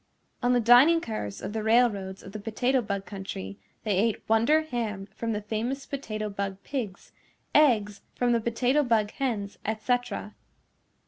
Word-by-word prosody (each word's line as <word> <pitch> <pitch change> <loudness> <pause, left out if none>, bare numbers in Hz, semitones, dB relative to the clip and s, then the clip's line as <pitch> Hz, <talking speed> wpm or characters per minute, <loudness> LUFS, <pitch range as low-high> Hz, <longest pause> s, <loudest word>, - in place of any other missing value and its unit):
On 245 0 +3
the 245 - +4
dining 245 +8 +7
cars 105 - -5
of - - -4
the 220 - -2
railroads 215 -4 +2
of 190 - -10
the 215 - -6
Potato 245 +5 +1
Bug 200 -3 -3
Country 100 - -7 0.2
they 205 -4 +1
ate 225 +1 0
wonder 230 +9 +4
ham 225 -9 -3
from 230 -1 -2
the 210 -1 -3
famous 230 +6 -3
Potato 215 -6 -4
Bug 200 -1 -4
Pigs, 235 -9 -5 0.4
eggs 215 -9 +3
from 245 -1 +1
the 235 -1 +2
Potato 245 +5 +2
Bug 225 -6 +1
Hens, 220 -7 -3
et 220 +1 -2
cetera. 245 -1 -1
225 Hz, 160 wpm, -27 LUFS, 205-245 Hz, 0.4 s, dining